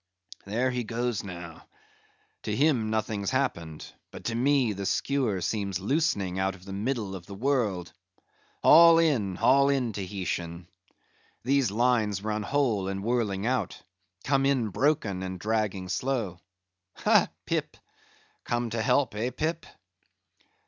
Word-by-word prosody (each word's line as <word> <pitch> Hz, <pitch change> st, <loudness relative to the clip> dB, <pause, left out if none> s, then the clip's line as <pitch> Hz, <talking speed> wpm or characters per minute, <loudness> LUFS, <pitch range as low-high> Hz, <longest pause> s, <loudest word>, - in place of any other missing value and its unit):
"There 120 Hz, +6 st, 0 dB
he 125 Hz, -1 st, -2 dB
goes 120 Hz, -1 st, -2 dB
now; 85 Hz, -4 st, -9 dB, 0.7 s
to -, -, -3 dB
him 130 Hz, -6 st, +2 dB
nothing's 110 Hz, -2 st, -1 dB
happened; 85 Hz, -, -2 dB, 0.2 s
but -, -, -11 dB
to 115 Hz, -, -2 dB
me, 130 Hz, -2 st, +2 dB
the 100 Hz, 0 st, -4 dB
skewer 125 Hz, -8 st, 0 dB
seems 100 Hz, -2 st, -2 dB
loosening 100 Hz, -, 0 dB
out 95 Hz, +1 st, 0 dB
of 90 Hz, -1 st, -16 dB
the 95 Hz, -, -7 dB
middle 105 Hz, -1 st, -2 dB
of 90 Hz, -3 st, -8 dB
the 100 Hz, -, -8 dB
world. 110 Hz, -7 st, -1 dB, 0.7 s
Haul 165 Hz, +1 st, +8 dB
in, 130 Hz, -, +2 dB
haul 135 Hz, +6 st, +4 dB
in, 130 Hz, -5 st, 0 dB
Tahitian! 90 Hz, -3 st, -4 dB, 0.8 s
These 135 Hz, -1 st, +2 dB
lines 110 Hz, -3 st, +1 dB
run 110 Hz, 0 st, -1 dB
whole, 115 Hz, -5 st, 0 dB
and 95 Hz, 0 st, -3 dB
whirling 110 Hz, -4 st, 0 dB
out: 125 Hz, -6 st, -1 dB, 0.4 s
come 135 Hz, -1 st, +2 dB
in 130 Hz, -6 st, +1 dB
broken, 110 Hz, -6 st, 0 dB
and 95 Hz, -1 st, -5 dB
dragging 105 Hz, -3 st, -1 dB
slow. 105 Hz, -2 st, -2 dB, 0.6 s
Ha, -, -, +4 dB, 0.2 s
Pip? -, -, -2 dB, 0.7 s
come 120 Hz, -1 st, -2 dB
to 115 Hz, 0 st, -1 dB
help; 125 Hz, +2 st, +2 dB
eh, 110 Hz, +4 st, -1 dB
Pip?" 155 Hz, +6 st, -3 dB
110 Hz, 135 wpm, -27 LUFS, 95-130 Hz, 0.8 s, Haul